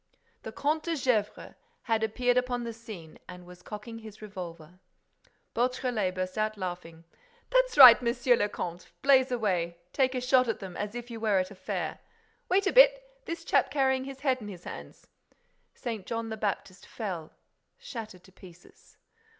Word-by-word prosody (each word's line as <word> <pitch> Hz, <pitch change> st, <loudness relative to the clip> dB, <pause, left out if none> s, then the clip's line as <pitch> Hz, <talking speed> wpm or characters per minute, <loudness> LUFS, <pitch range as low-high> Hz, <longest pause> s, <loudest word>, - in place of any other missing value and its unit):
The -, -, -7 dB
Comte 305 Hz, +2 st, 0 dB
de 335 Hz, -1 st, 0 dB
Gesvres 250 Hz, -7 st, -1 dB, 0.3 s
had 225 Hz, -3 st, +1 dB
appeared 245 Hz, +3 st, +1 dB
upon 250 Hz, -1 st, 0 dB
the 230 Hz, -1 st, -5 dB
scene 215 Hz, -9 st, -11 dB
and 180 Hz, 0 st, -10 dB
was 180 Hz, 0 st, -14 dB
cocking 220 Hz, +4 st, -8 dB
his 220 Hz, -2 st, -12 dB
revolver. 180 Hz, -4 st, -9 dB, 0.7 s
Beautrelet 240 Hz, -6 st, 0 dB
burst 185 Hz, +2 st, -3 dB
out 215 Hz, 0 st, -1 dB
laughing: 175 Hz, -3 st, -6 dB, 0.5 s
"That's -, -, +2 dB
right, 255 Hz, -3 st, +11 dB
Monsieur 245 Hz, +1 st, +2 dB
le 205 Hz, -2 st, 0 dB
Comte, 175 Hz, -2 st, -6 dB
blaze 265 Hz, -1 st, +5 dB
away!—Take 185 Hz, +3 st, -1 dB
a -, -, 0 dB
shot 255 Hz, 0 st, +4 dB
at 225 Hz, -, -1 dB
them, 190 Hz, -5 st, -8 dB
as 210 Hz, +2 st, -4 dB
if 240 Hz, 0 st, -7 dB
you 230 Hz, -, -6 dB
were 215 Hz, -3 st, +2 dB
at 185 Hz, +1 st, -1 dB
a -, -, -10 dB
fair!—Wait 445 Hz, -, -4 dB
a 385 Hz, -, +1 dB
bit—this -, -, +3 dB
chap -, -, +3 dB
carrying 265 Hz, -2 st, +1 dB
his 270 Hz, 0 st, -9 dB
head 260 Hz, -3 st, +1 dB
in 210 Hz, -, -7 dB
his 180 Hz, -4 st, -9 dB
hands—" -, -, -10 dB, 0.7 s
St. 225 Hz, -6 st, -5 dB
John 230 Hz, -1 st, -3 dB
the 220 Hz, -, -3 dB
Baptist 200 Hz, -2 st, -4 dB
fell, 180 Hz, -8 st, -6 dB, 0.4 s
shattered 225 Hz, -, -8 dB
to 190 Hz, -, -18 dB
pieces. 180 Hz, -2 st, -17 dB
225 Hz, 165 wpm, -29 LUFS, 185-260 Hz, 0.7 s, right